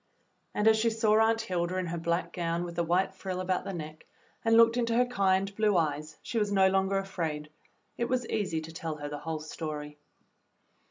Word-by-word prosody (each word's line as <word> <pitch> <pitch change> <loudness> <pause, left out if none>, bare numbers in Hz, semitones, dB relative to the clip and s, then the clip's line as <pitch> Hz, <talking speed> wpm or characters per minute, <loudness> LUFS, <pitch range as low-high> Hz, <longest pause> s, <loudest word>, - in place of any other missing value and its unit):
And 210 - +2
as 220 0 +6
she 230 +1 +3
saw 220 -1 +3
Aunt 225 0 +3
Hilda 180 0 -1
in 185 - -1
her 170 0 -3
black 170 +1 -1
gown 170 0 -1
with 170 -1 -6
the 170 - +1
white 185 +3 +1
frill 190 -1 -5
about 185 0 -1
the - - -3
neck 155 -3 -8 0.4
and 225 0 +4
looked 230 0 +6
into 235 -1 +1
her 250 +1 +4
kind 195 -4 +1
blue 210 -3 +3
eyes, 155 -1 -1
she 230 - -1
was 205 -1 0
no 190 -1 +5
longer 190 +1 +1
afraid. 160 -6 -3 0.5
It 235 - +1
was 250 0 0
easy 190 -8 -1
to 160 +1 -9
tell 165 -1 -4
her 145 -1 -6
the 145 0 -5
whole 160 +1 -4
story. 150 -2 -6
185 Hz, 210 wpm, -29 LUFS, 160-215 Hz, 0.5 s, as